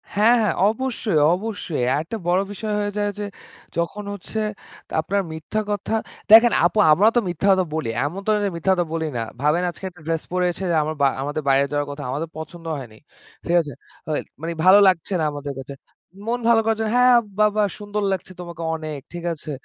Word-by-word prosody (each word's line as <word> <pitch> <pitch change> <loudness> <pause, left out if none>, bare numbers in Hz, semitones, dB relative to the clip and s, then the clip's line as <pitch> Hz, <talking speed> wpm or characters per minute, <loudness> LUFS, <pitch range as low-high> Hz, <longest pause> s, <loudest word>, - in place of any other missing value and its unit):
হ্যাঁ, 220 +4 +5
হ্যাঁ। 210 - +1 0.2
অবশ্যই, 225 - -1 0.2
অবশ্যই। 195 - -4
আরেকটা 160 +10 -2
বড় 180 +2 +3
বিষয় 210 +1 -4
হয়ে 205 0 -1
যায় 205 0 0
যে 205 - -2 0.5
যখন 170 +5 -2
হচ্ছে 205 +2 -6 0.5
তা - - -13
আপনার 200 +5 0
মিথ্যা 160 +7 -3
কথা, 205 +1 -2 0.4
দেখেন 230 +2 +9
আপু 195 +5 +2
আমরাও 200 +9 +5
তো - - +7
মিথ্যা 175 +3 -1
কথা 190 -1 +3
বলি, 160 -7 -2 0.2
এমন 175 +7 -4
তো - - -1
না - - +1
যে - - +1
মিথ্যা 170 +3 +1
কথা 175 -1 0
বলি 160 -1 -1
না। - - -1 0.2
ভাবেন 150 +5 +2
আজকে 170 - -12
একটা 175 -3 -19
dress 165 -1 -1
পরেছে 180 0 0
যে - - +2
আমা 155 - -2 0.3
আমাদের 145 +2 -2
বাইরে 135 +1 +4
যাওয়ার 145 0 -1
কথা, 145 0 -7
আমাদের 150 +5 -3
পছন্দ 165 +2 -9
হয়নি। 120 -5 -10 0.5
ঠিক 175 - +1
আছে? 145 -4 -8 0.3
হয়, 155 -1 -1 0.2
মানে 165 +1 -3
ভালো 190 +2 +8
লাগছে 185 +1 +1
না - - 0
আমাদের 145 -1 -5
কাছে। 135 +1 -8 0.5
মন 240 +1 0
ভালো 230 -1 +6
করার 225 -1 +1
জন্য। 220 -1 -1
হ্যাঁ, 250 0 +6 0.2
বা, 215 - +5
বা 210 - +4 0.2
সুন্দর 205 0 -3
লাগছে 190 -1 -3
তোমাকে 170 -1 -7
অনেক, 155 -2 -5
ঠিক 175 -1 -6
আছে? 155 -1 -8
175 Hz, 205 wpm, -22 LUFS, 155-210 Hz, 0.5 s, দেখেন